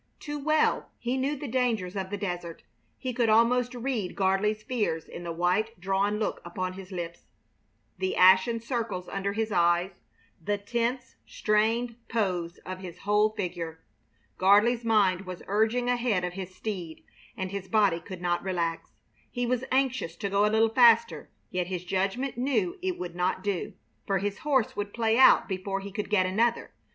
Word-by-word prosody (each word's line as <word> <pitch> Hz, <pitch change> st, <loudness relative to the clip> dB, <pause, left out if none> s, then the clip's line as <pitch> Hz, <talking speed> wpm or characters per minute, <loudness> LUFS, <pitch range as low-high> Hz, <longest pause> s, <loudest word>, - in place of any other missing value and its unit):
Too 295 Hz, 0 st, -5 dB
well 310 Hz, +2 st, +1 dB
he 245 Hz, +2 st, -2 dB
knew 270 Hz, +3 st, 0 dB
the 285 Hz, +1 st, -6 dB
dangers 225 Hz, -7 st, 0 dB
of 190 Hz, -1 st, -3 dB
the 205 Hz, -, -3 dB
desert. 175 Hz, -4 st, -5 dB, 0.3 s
He 255 Hz, -2 st, -4 dB
could 235 Hz, -1 st, +1 dB
almost 245 Hz, +3 st, +3 dB
read 240 Hz, -6 st, -2 dB
Gardley's 205 Hz, +3 st, +1 dB
fears 210 Hz, -9 st, -2 dB
in 175 Hz, -, -8 dB
the 170 Hz, -, -4 dB
white, 180 Hz, +6 st, 0 dB
drawn 195 Hz, +3 st, 0 dB
look 215 Hz, -, -2 dB
about 185 Hz, -3 st, -4 dB
his 190 Hz, 0 st, -10 dB
lips, 170 Hz, -2 st, -6 dB, 0.7 s
the 190 Hz, 0 st, -1 dB
ashen 190 Hz, +5 st, +5 dB
circles 225 Hz, -6 st, -3 dB
under 195 Hz, 0 st, -2 dB
his 220 Hz, +1 st, -2 dB
eyes, 175 Hz, +1 st, +2 dB, 0.5 s
the 205 Hz, +4 st, 0 dB
tense, 235 Hz, +5 st, -2 dB
strained 225 Hz, +3 st, +1 dB
pose 180 Hz, -6 st, -1 dB
of 185 Hz, 0 st, -6 dB
his 180 Hz, -2 st, -8 dB
whole 210 Hz, +1 st, +3 dB
figure. 175 Hz, -6 st, -5 dB, 0.6 s
Gardley's 210 Hz, +5 st, +4 dB
mind 195 Hz, -4 st, +2 dB
was 180 Hz, -1 st, -7 dB
urging 220 Hz, +5 st, +1 dB
ahead 240 Hz, -6 st, +1 dB
of 180 Hz, 0 st, -3 dB
his 185 Hz, 0 st, -7 dB
steed, 180 Hz, -8 st, -5 dB, 0.3 s
and 190 Hz, 0 st, -3 dB
his 200 Hz, -1 st, -5 dB
body 205 Hz, -6 st, +3 dB
could 180 Hz, 0 st, -9 dB
not 175 Hz, -1 st, +1 dB
relax. 170 Hz, -3 st, -3 dB, 0.4 s
He 245 Hz, -1 st, -2 dB
was 250 Hz, +1 st, 0 dB
anxious 260 Hz, -10 st, 0 dB
to 200 Hz, +3 st, -4 dB
go 200 Hz, +1 st, +3 dB
a -, -, +2 dB
little 220 Hz, +1 st, +3 dB
faster, 230 Hz, -, +4 dB, 0.2 s
yet 180 Hz, -1 st, -1 dB
his 180 Hz, -1 st, -4 dB
judgment 195 Hz, +8 st, -1 dB
knew 350 Hz, +9 st, 0 dB
it 370 Hz, -1 st, -2 dB
would 175 Hz, -1 st, -5 dB
not 180 Hz, +1 st, -1 dB
do, 200 Hz, -4 st, -2 dB, 0.3 s
for 195 Hz, -, +2 dB
his 200 Hz, +1 st, -3 dB
horse 275 Hz, -7 st, +1 dB
would 205 Hz, 0 st, -4 dB
play 225 Hz, 0 st, +2 dB
out 265 Hz, -, +7 dB
before 195 Hz, 0 st, -3 dB
he 200 Hz, +1 st, -8 dB
could 210 Hz, +1 st, -4 dB
get 195 Hz, -3 st, +3 dB
another. 225 Hz, +6 st, 0 dB
205 Hz, 175 wpm, -28 LUFS, 185-235 Hz, 0.7 s, out